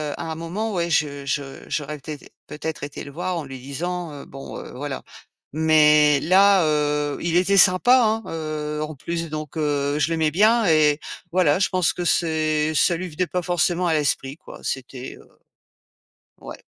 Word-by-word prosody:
à 165 -1 -5
un - - -4
moment, 185 +7 -4
ouais, 170 -1 -1
je 145 -3 0
je 140 -1 -4
j'aurais 150 0 -3
peut-être 150 +1 -9 0.2
peut-être 155 0 -6
été 145 - -6
le 140 - -10
voir 180 +4 -3
en 160 - -4
lui 135 -2 -9
disant: 165 +5 -5
«Heu, 140 - -9
bon, 135 0 -9
heu, - - -9
voilà!» 135 0 -5 0.5
Mais 150 -2 +5
là, 195 +1 +5
heu, 150 -1 0
il 170 0 -1
était 195 +2 +3
sympa, 225 +8 +6
hein, 220 0 +1
heu, 155 -1 -4
en 155 0 -5
plus, 165 +3 -4
donc, 155 0 -6
heu, 145 -1 0
je 160 - +1
l'aimais 160 -2 +1
bien 220 +5 +4
et 155 -2 +4 0.3
voilà, 175 -4 +3
je 190 - +2
pense 185 -3 +1
que 175 - -4
c'est 155 -2 +1
ça 170 +3 +3
lui 185 +1 -5
venait 175 +3 -2
pas 180 - -2
forcément 175 +1 0
à 165 - +2
l'esprit, 145 -2 0
quoi, - - -13
c’était, 130 0 -5
heu - - -18 1.1
ouais. - - -9
155 Hz, 185 wpm, -22 LUFS, 145-175 Hz, 1.1 s, sympa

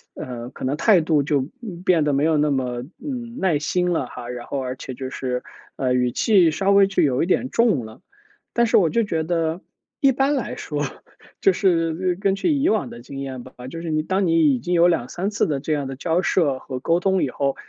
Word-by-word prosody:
呃， 120 -1 -6
可 - - -10
能 135 +3 -1
态 190 -2 +5
度 155 -3 +2
就， 145 -2 +1 0.2
嗯 180 -7 -8
变 170 -5 +3
得 145 - +1
没 140 +2 +1
有 160 -1 +3
那 150 0 +2
么， 125 -2 -2 0.2
嗯， 245 -4 -5
耐 180 -6 +2
心 180 +4 0
了 160 -6 0
哈。 120 0 -8
然 120 -1 -6
后 140 - -3
而 130 0 -4
且 130 - -7
就 130 +1 -6
是， 125 -1 -3 0.3
呃， 130 -2 0
语 125 -1 +1
气 185 - +4
稍 195 +5 +1
微 200 0 +6
就 195 - 0
有 135 0 +2
一 - - +1
点 245 +8 +1
重 225 - +2
了， 110 +9 -13 0.5
但 235 -1 +3
是 - - +4
我 170 -6 +4
就 235 - +2
觉 165 -6 -1
得 165 +1 -1 0.4
一 275 -2 +5
般 275 +3 +1
来 255 - -3
说， 145 -1 -3 0.6
就 195 - +5
是 175 -1 +1
根 195 -1 +2
据 300 - +1
以 280 +1 +2
往 220 - 0
的 120 - -9
经 135 +2 -9
验 135 -2 -5
吧， - - -13 0.2
就 165 +5 -7
是 165 - -5
你 155 0 0
当 190 +2 0
你 165 -3 +4
已 125 - -1
经 175 +8 -1
有 170 +1 +6
2-3 175 - -1
次 205 - +1
的 145 -3 -1
这 155 +2 -2
样 140 -2 -2
的 135 - -6
交 165 +5 0
涉 150 -8 +1
和 130 -2 -6
沟 165 +6 +1
通 190 0 +1
以 135 - 0
后， 140 -1 -1
160 Hz, 255 characters per minute, -22 LUFS, 135-190 Hz, 0.6 s, 微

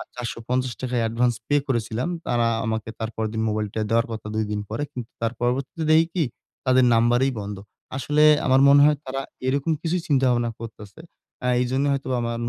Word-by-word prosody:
৳৪৫০ 125 0 -3
য় 115 - +1
advance 115 +1 +1
pay 145 - +2
করেছিলাম। 120 +2 -1 0.2
তারা 120 -1 +2 0.2
আমাকে 110 0 -2
তার 110 - -2
পরেরদিন 110 0 -2
মোবাইলটা 105 0 -2
দেওয়ার 115 +2 +3
কথা। 110 -1 -6
২ 110 - 0
দিন 105 0 -2
পরে। 110 +7 -3
কিন্তু 120 -2 -7
তার 115 0 0
পরবর্তীতে 130 +6 -1
দেখি 160 +1 +6
কি? 170 - +2 0.4
তাদের 130 -1 +4
নাম্বারেই 120 +3 +3
বন্ধ। 100 0 -6 0.4
আসলে 150 +3 +2 0.2
আমার 130 0 +4
মনে 140 +1 +7
হয় 150 -1 +4
তারা 135 +1 -3 0.3
এরকম 140 +4 +1
কিছুই 175 +1 -1
চিন্তাভাবনা 125 -5 +2
করতেছে। 110 +2 -10 0.4
আ - - +1
এইজন্য 130 +3 0
হয়তোবা 130 -2 -2
আমার 115 0 -2
120 Hz, 175 wpm, -24 LUFS, 115-135 Hz, 0.4 s, মনে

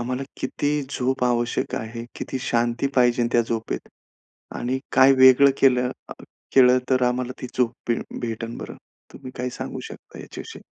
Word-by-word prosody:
आम्हाला 125 +2 -3 0.2
किती 145 +2 -1 0.2
झोप 130 -1 -1
आवश्यक 120 -1 0
आहे? 115 +1 -5
किती 130 - -4
शांती 120 +2 0
पाहिजे 120 -1 +3
त्या 120 - +4
झोपेत 115 - -4 0.7
आणि 130 +2 -1
काय 135 +1 +6
वेगळं 130 +1 +7
केलं 125 -2 +4 0.2
अ, - - -6 0.4
केलं 125 -1 +6
तर 130 -1 +3
आम्हाला 125 +1 -2
ती - - -3
झोप 125 -2 +2 0.2
भे 115 - +1 0.2
भेटेन 115 0 -4
बरं? - - -8 0.4
तुम्ही 130 -2 -10
काय 125 +1 -3
सांगू - - -6
शकता - - -13
याच्याविषयी? - - -10
125 Hz, 155 wpm, -23 LUFS, 120-130 Hz, 0.7 s, वेगळं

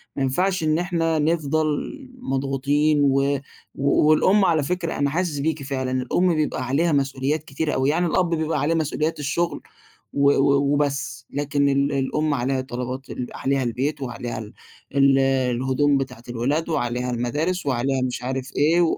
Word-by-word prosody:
ما 135 - -1
ينفعش 180 +6 0
إن 155 0 +2
إحنا 165 -3 0
نفضل 155 0 +1 0.5
مضغوطين، 140 - +1
و 140 +1 +2 0.4
والأم 155 +8 +4
على 160 -4 +2
فكرة 175 +1 -2
أنا 140 0 +1
حاسس 160 -2 -1
بيكِ 155 -1 -1
فعلًا، 130 -1 -3
الأم 155 +8 +1
بيبقى 150 -4 -1
عليها 160 +5 +2
مسؤوليات 140 +1 0
كتيرة 150 +1 -3
أوي 130 +1 +1
يعني 175 +4 +1
الأب 175 +1 +1
بيبقى 160 -2 -1
عليه 150 +4 +1
مسؤوليات 155 0 -1
الشغل، 160 +4 -1 0.5
و 140 0 +4
و 140 0 +3
وبس 145 -1 -2
لكن 145 0 0
ال 140 +1 +1
الأم 145 +2 0
عليها 130 +1 0
طلبات 130 +1 -5
ال 125 - -4
عليها 135 0 0
البيت 135 +5 -2
وعليها 120 -2 -4
ال 110 +1 -9 1.0
الهدوم 135 +2 +2
بتاعة 125 -3 -5
الولاد 130 +8 -1
وعليها 125 -5 -1
المدارس 145 +9 -1
وعليها 130 0 0
مش 125 -1 -2
عارف 130 +1 -3
إيه 165 +4 +4
140 Hz, 150 wpm, -23 LUFS, 130-155 Hz, 1.0 s, والأم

